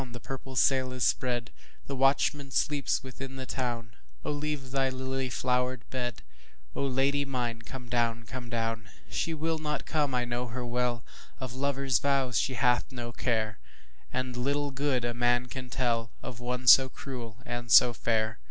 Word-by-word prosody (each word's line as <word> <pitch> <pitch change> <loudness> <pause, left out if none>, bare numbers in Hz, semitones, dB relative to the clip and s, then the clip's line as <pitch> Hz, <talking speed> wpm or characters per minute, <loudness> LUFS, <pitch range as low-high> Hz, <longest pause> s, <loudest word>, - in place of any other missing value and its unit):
the 120 - -6
purple 135 +1 -7
sail 130 0 +3
is 130 -1 -2
spread, 120 -2 +1 0.3
The 140 - -4
watchman 135 +1 +2
sleeps 145 +1 +1
within 135 +1 -7
the 130 -1 -5
town,O 115 - -4
leave 145 -3 -3
thy 135 -1 +2
lily 130 0 -2
flowered 125 0 0
bed,O 120 - -6
Lady 135 +2 +2
mine 120 -4 -2
come 125 +2 -8
down, 115 -1 +1
come 125 0 -7
down! 115 -1 -2 0.2
She 165 - -1
will 160 +1 -1
not 150 -1 -2
come, 145 -4 +1
I 125 -1 +1
know 120 +1 -2
her 120 +1 -4
well, 120 -1 0 0.4
Of 130 -2 -5
lover's 135 -2 +1
vows 135 -3 +2
she 130 - 0
hath 125 0 +2
no 120 -2 -5
care, 110 -3 -1 0.5
And 130 0 -2
little 140 +3 0
good 135 -2 0
a 120 - -1
man 120 +1 +2
can 125 0 -7
tellOf 115 -1 -2
one 125 +1 -3
so 130 +1 +9
cruel 120 -4 -7
and 120 -1 -4
so 120 - +9
fair. 110 -2 0
125 Hz, 160 wpm, -29 LUFS, 120-135 Hz, 0.5 s, so